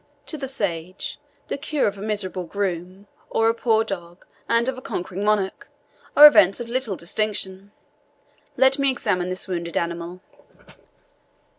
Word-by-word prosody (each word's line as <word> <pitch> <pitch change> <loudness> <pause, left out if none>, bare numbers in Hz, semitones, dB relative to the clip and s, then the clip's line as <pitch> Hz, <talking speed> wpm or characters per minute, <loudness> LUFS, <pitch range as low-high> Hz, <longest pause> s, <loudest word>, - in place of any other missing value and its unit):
To - - -5
the 270 - -4
sage, 185 -8 -4 0.3
the - - -4
cure 295 0 0
of 205 - 0
a 195 - -10
miserable 200 -4 -3
groom, 185 0 -4 0.3
of 225 - +1
a 225 0 +4
poor 225 -1 +2
dog 175 -4 -7 0.2
and 230 +1 +3
of 265 - -1
a 255 - -9
conquering 185 -3 -4
monarch, 210 -2 0 0.5
are 295 - +12
events 195 -10 +7
of 240 - -5
little 240 -4 -1
distinction. 195 +1 -3 0.9
Let 265 +1 +4
me 275 0 +3
examine 180 -8 -1
this 185 +2 -4
wounded 170 -2 -3
animal." 170 +1 -3
200 Hz, 150 wpm, -23 LUFS, 180-230 Hz, 0.9 s, are